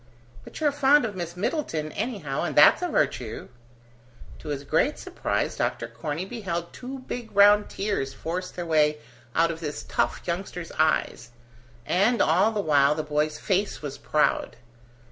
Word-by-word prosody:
"But - - -10
you're 300 -2 +2
fond 285 -1 +4
of 210 -3 -4
Miss 175 -1 -5
Middleton 180 - -2
anyhow, 160 - -3
and 155 -5 -2
that's 150 - +7
a 360 - 0
virtue." 115 - -1 0.9
To - - -12
his 140 -1 -3
great 160 - +1
surprise, - - -2
Dr. - - -2
Corney 160 +3 -4
beheld 180 -6 -4
two 260 +1 -8
big 240 -3 -6
round 205 +1 +6
tears 195 -10 -2
force 180 +6 -4
their 175 - -6
way 150 -2 +3 0.4
out 165 +1 +3
of 165 - -7
this 150 -3 -5
tough - - -1
youngster's 175 -1 -4
eyes, 155 -6 +1 0.6
and 210 +6 +2
all 185 +8 +4
the 215 - -2
while 145 -3 +3
the 155 - -2
boy's 150 0 -1
face 195 -3 -1
was 140 -2 -6
proud. 155 - +1
170 Hz, 160 wpm, -26 LUFS, 150-210 Hz, 0.9 s, that's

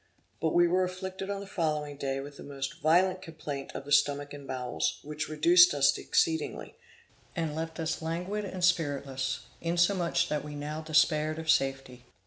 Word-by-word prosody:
But 160 - 0
we 175 0 +6
were 185 +2 +2
afflicted 190 +1 -5
on 200 -1 -3
the - - -7
following 155 -6 -2
day 135 -1 -2
with 140 +1 -8
the - - -11
most 140 +4 -6
violent 185 +4 +3
complaint 150 -5 -6
of 140 - -6
the 145 - -9
stomach 145 0 +2
and 140 -1 -9
bowels, 125 -1 -2
which 150 +1 -4
reduced 170 +2 +6
us 140 0 +4
exceedingly, 160 -1 0 0.6
and 160 -2 -2
left 160 0 -5
us 160 0 -2
languid 180 +6 -3
and 185 -2 -5
spiritless, 140 -6 0 0.2
insomuch 175 +1 +2
that 150 -1 -1
we 150 0 -7
now 150 +2 -4
despaired 155 0 +2
of 160 -1 +2
safety. 135 -2 -1
155 Hz, 170 wpm, -29 LUFS, 145-175 Hz, 0.6 s, we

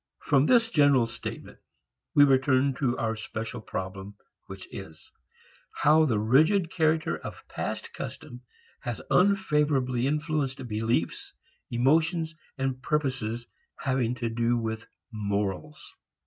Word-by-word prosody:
From 140 0 +3
this 230 -2 +4
general 140 -5 +5
statement 115 - -8 0.6
we 145 - +8
return 135 0 +3
to 125 -3 +1
our 115 -1 -1
special 110 +2 -5
problem, 95 0 -6 0.3
which 95 -1 -9
is 80 -5 -10 0.6
how 155 +2 +4
the 120 -7 +1
rigid 155 - +3
character 160 -1 +1
of - - -9
past - - -5
custom 120 0 -7 0.4
has 120 -3 -4
unfavorably 150 -10 +2
influenced 150 -3 -1
beliefs, 105 -6 -1 0.4
emotions 160 +6 +2 0.2
and 130 -1 -2
purposes 130 -6 -1 0.3
having 130 -2 0
to 120 -2 -2
do 120 +1 +1
with 110 -1 -4 0.2
morals. 105 +6 -3
130 Hz, 115 wpm, -27 LUFS, 115-150 Hz, 0.6 s, we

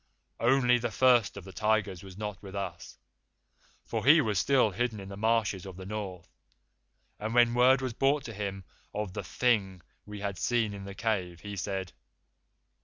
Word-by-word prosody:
"Only 125 0 +4
the 120 0 -2
First 120 -4 +3
of 100 - -7
the 95 +1 -11
Tigers 105 -4 0
was 95 -1 -11
not 105 -3 -5
with 100 -1 -9
us, 90 -4 -6 0.9
for 110 -2 -3
he 150 +6 +7
was 110 -8 +1
still 130 -6 +3
hidden 115 +2 -2
in 95 0 -8
the 100 - -7
marshes 110 -3 +1
of 95 -2 -9
the 95 - -8
North, 95 -4 -6 0.9
and 110 +2 -3
when 120 -1 +5
word 125 +2 +5
was 130 -2 -2
brought 135 +3 +2
to 115 - -7
him 100 -2 -4 0.3
of 105 -3 -3
the - - -4
Thing 100 -7 +1 0.3
we 105 0 -7
had 100 -3 -4
seen 115 -4 +1
in 100 -1 -8
the 100 0 -8
cave, 95 -7 -2
he 105 -1 -6
said. 95 -1 -4
105 Hz, 180 wpm, -29 LUFS, 95-120 Hz, 0.9 s, he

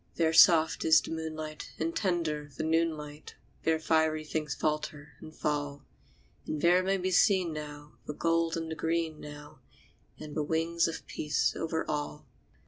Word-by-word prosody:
There 160 -1 +2
soft 160 -1 +6
is 160 0 +6
the - - -8
moonlight, 155 -1 -5
and 165 +1 -2
tender 165 -6 -1
the - - -2
noon 160 0 +1
light; 150 0 -10 0.3
There 160 0 +2
fiery 160 -1 +1
things 150 -2 -3
falter 150 -1 -2
and 155 - -10
fall; 145 -2 -3 0.6
And 155 - -2
there 175 +3 +4
may 195 +1 +1
be 185 0 -2
seen, 185 -4 +3
now, 150 -1 -8
the 150 - -4
gold 165 0 +1
and 165 -1 -4
the - - -3
green, 165 -1 -1
now, 145 0 -11 0.6
And 150 -1 -8
the 155 - 0
wings 165 +3 +1
of 165 - -5
a - - -31
peace 150 -1 -1
over 160 0 -2
all. 150 0 -3
160 Hz, 170 wpm, -30 LUFS, 150-165 Hz, 0.6 s, soft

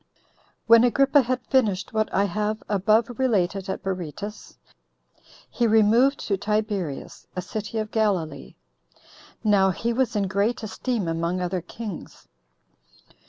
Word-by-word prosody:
1. 230 0 +7
When - - +3
Agrippa 275 +3 +4
had 250 0 -2
finished 215 -9 +1
what 215 0 0
I 195 - +2
have 210 +2 -2
above 215 +4 +1
related 195 -6 0
at - - -4
Berytus, 190 +3 -6 0.9
he 240 - 0
removed 225 +5 +4
to 200 - -1
Tiberias, 205 -7 -3
a 180 - -2
city 215 +3 -5
of 215 0 -3
Galilee. 180 -10 -1 0.9
Now 200 -3 +4
he 230 +6 -1
was 245 -1 0
in 200 -2 +1
great 205 +5 0
esteem 220 -2 -2
among 170 +2 -1
other 180 0 -2
kings. 210 +1 -9
210 Hz, 130 wpm, -24 LUFS, 190-230 Hz, 0.9 s, 1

